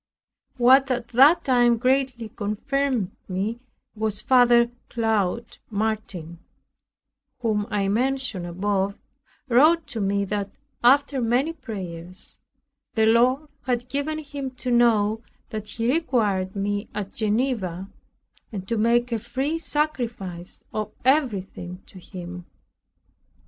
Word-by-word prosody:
What 260 +3 +6
at 245 -2 -2
that 275 +8 +6
time 240 -2 +4
greatly 255 -2 0
confirmed 230 +1 -1 0.2
me 200 +5 -2 0.4
was 215 -1 -1
Father 240 -1 +5 0.2
Claude 225 0 -1
Martin, 200 -6 -3 1.0
whom 215 -3 0
I 200 -1 0
mentioned 240 -4 0
above, 195 +3 -1 0.5
wrote 310 +7 +5
to 225 - -4
me 200 0 +1
that, 200 0 -2 0.3
after 275 +2 +4
many 250 +7 +1
prayers, 185 - -6 0.6
the 220 -1 +4
Lord 250 +6 +3 0.2
had 245 0 -1
given 285 +3 -1
him 285 -3 -5
to 250 0 -3
know 225 -2 +3 0.3
that 215 -2 -5
He 230 +4 0
required 210 - 0
me 205 +1 -2
at 200 -2 -4
Geneva, 210 -5 -1 0.6
and 195 -3 -6
to 230 0 -1
make 240 +2 +2
a 230 - 0
free 265 +8 -2
sacrifice 235 - -3
of 215 -1 -3
everything 195 - 0
to 190 - -13
Him. 180 0 -9
230 Hz, 115 wpm, -24 LUFS, 200-255 Hz, 1.0 s, What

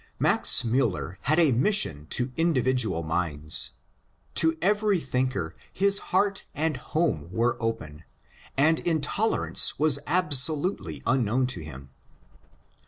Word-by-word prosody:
Max - - +3
Miiller 115 -6 -1
had 155 - +3
a 165 -5 +4
mission 120 - +1
to 125 +1 -1
individual 130 - +1
minds. 80 -2 0 0.6
To 160 0 +1
every 205 +1 +1
thinker 125 - -3 0.2
his 200 +1 +2
heart 195 +1 0
and 155 0 -1
home 125 - -2
were 115 +5 0
open, 85 -10 -5 0.5
and 160 +4 +3
intolerance 170 +6 0
was 155 0 +3
absolutely 155 +1 +1
unknown 130 0 +1
to - - -8
him. 70 -3 -11
130 Hz, 110 wpm, -26 LUFS, -, 0.6 s, a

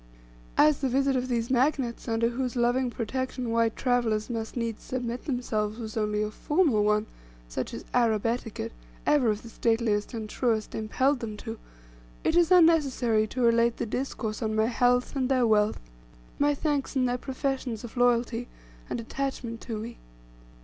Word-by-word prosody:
As 300 -1 +5
the 270 - 0
visit 270 +1 +2
of 255 0 0
these 235 -1 -1
magnates, 260 -2 +1
under 230 0 +1
whose 250 +1 -3
loving 245 +1 +2
protection 250 +1 -3
white 230 -1 +2
travellers 240 -3 0
must 225 +1 -4
needs 230 -2 -2
submit 245 -1 -4
themselves, 220 -5 -1
was 220 -3 -6
only 210 -1 0
a 215 - -3
formal 295 - +2
one, 210 0 +2 0.4
such - - -4
as - - -7
Arab 230 -4 +2
etiquette, 230 - -2 0.3
ever 275 -6 +4
of 210 0 -1
the 230 - -9
stateliest 225 -1 0
and 220 -1 -4
truest, 220 -2 -1
impelled 260 +5 +1
them 215 -3 -5
to, 225 +1 -7 0.6
it 320 - +1
is 345 -1 +5
unnecessary 280 -11 +4
to 250 +3 -2
relate 235 0 +3
the - - -2
discourse 225 -2 -3
on 220 -1 -1
my 220 0 +3
health, 245 +2 +2
and 260 -2 0
their 255 -2 +3
wealth, 215 -1 +3 0.6
my 290 0 +3
thanks, 290 -2 -1
and 255 -1 +2
their 245 0 -1
professions 265 -4 -3
of 235 - -9
loyalty, 245 -1 +2 0.4
and - - -2
attachment 235 -1 -4
to 225 -3 -4
me. 230 +2 -7
240 Hz, 170 wpm, -27 LUFS, 220-260 Hz, 0.6 s, As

